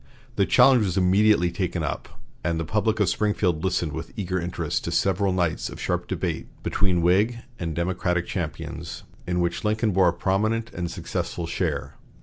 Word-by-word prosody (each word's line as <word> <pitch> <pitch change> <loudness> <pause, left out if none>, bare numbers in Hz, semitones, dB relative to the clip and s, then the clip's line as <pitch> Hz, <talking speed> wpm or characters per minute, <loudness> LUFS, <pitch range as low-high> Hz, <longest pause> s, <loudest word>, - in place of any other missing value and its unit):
The - - +2
challenge 130 -4 +6
was 95 -2 -1
immediately 95 -1 +4
taken 85 -1 -2
up, 70 -4 -3 0.3
and 85 -1 0
the 80 - -2
public 110 +4 0
of 105 - +3
Springfield 90 -5 +1
listened 85 -4 0
with 80 +2 -6
eager 90 -2 -1
interest 85 +1 -2
to - - -2
several 95 0 +2
nights 90 -3 0
of - - -9
sharp - - -1
debate - - -2 0.2
between 90 -4 +1
Whig 100 +7 +3 0.2
and 80 -3 -3
Democratic 85 0 0
champions, - - -5 0.2
in 90 0 0
which 85 0 -1
Lincoln 110 +1 +1
bore 95 -1 +4
a - - -1
prominent 110 +6 0
and 85 -1 -3
successful 85 - -3
share. - - -2
90 Hz, 170 wpm, -25 LUFS, 85-105 Hz, 0.3 s, challenge